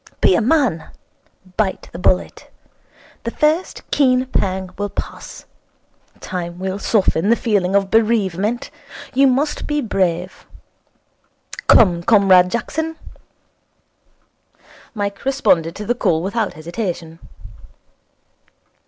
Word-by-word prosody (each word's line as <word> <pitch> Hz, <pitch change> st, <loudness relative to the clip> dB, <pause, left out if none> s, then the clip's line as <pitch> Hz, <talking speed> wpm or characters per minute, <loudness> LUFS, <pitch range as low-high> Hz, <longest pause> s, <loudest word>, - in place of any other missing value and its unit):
Be -, -, +4 dB
a 180 Hz, -, +2 dB
man. 245 Hz, -, +1 dB, 0.7 s
Bite 200 Hz, -3 st, -1 dB
the 170 Hz, -, -8 dB
bullet. 180 Hz, 0 st, 0 dB, 0.7 s
The 230 Hz, -, -2 dB
first 305 Hz, +8 st, 0 dB
keen 255 Hz, -2 st, +3 dB
pang 190 Hz, -6 st, -2 dB
will 205 Hz, 0 st, -3 dB
pass. -, -, -7 dB, 0.7 s
Time 175 Hz, -2 st, -5 dB
will 190 Hz, +1 st, -4 dB
soften 200 Hz, -3 st, +1 dB
the 235 Hz, -, +5 dB
feeling 200 Hz, -5 st, 0 dB
of 195 Hz, -1 st, +1 dB
bereavement. 220 Hz, +2 st, +1 dB, 0.4 s
You 270 Hz, +1 st, +4 dB
must 275 Hz, +4 st, 0 dB
be 295 Hz, 0 st, 0 dB
brave. 185 Hz, -7 st, -2 dB, 1.2 s
Come, 180 Hz, -6 st, +5 dB
Comrade 190 Hz, -2 st, +5 dB
Jackson.' 320 Hz, +9 st, -3 dB, 2.0 s
Mike 200 Hz, -1 st, -4 dB
responded 180 Hz, -, +1 dB
to 210 Hz, -, -6 dB
the 240 Hz, -, +1 dB
call 165 Hz, -9 st, 0 dB
without 210 Hz, +2 st, -2 dB
hesitation. 170 Hz, 0 st, -5 dB
200 Hz, 105 wpm, -19 LUFS, 180-240 Hz, 2.0 s, the